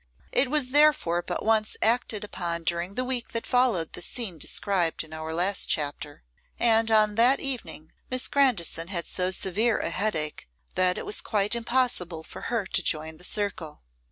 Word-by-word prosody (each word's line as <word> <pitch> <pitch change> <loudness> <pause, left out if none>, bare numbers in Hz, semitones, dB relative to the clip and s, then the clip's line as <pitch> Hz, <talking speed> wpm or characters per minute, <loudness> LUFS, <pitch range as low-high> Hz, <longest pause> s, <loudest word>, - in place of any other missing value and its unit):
It 255 - +2
was 290 -3 +2
therefore 290 - +3
but - - -5
once 220 -1 +1
acted 225 -2 0
upon 170 -4 -4
during 170 +3 -1
the 255 - -1
week 250 -2 -2
that 230 - -2
followed 240 -10 +1
the - - -5
scene 200 -10 0
described 180 -1 +1
in 155 0 -13
our 160 0 -6
last 180 +5 0
chapter, 145 -1 -2 0.3
and 225 -1 +3
on 215 -1 +3
that 250 +4 +5
evening 245 - -3 0.2
Miss 255 0 +2
Grandison 215 - +1
had 175 -3 -3
so 180 0 -2
severe 195 +5 0
a - - -2
headache, 155 - -2 0.2
that 185 0 +3
it - - -5
was - - 0
quite 210 0 0
impossible 235 -9 +1
for - - -10
her 230 -4 -1
to 190 - 0
join 160 -1 -1
the 180 - -12
circle. 180 - -4
200 Hz, 175 wpm, -26 LUFS, 170-235 Hz, 0.3 s, that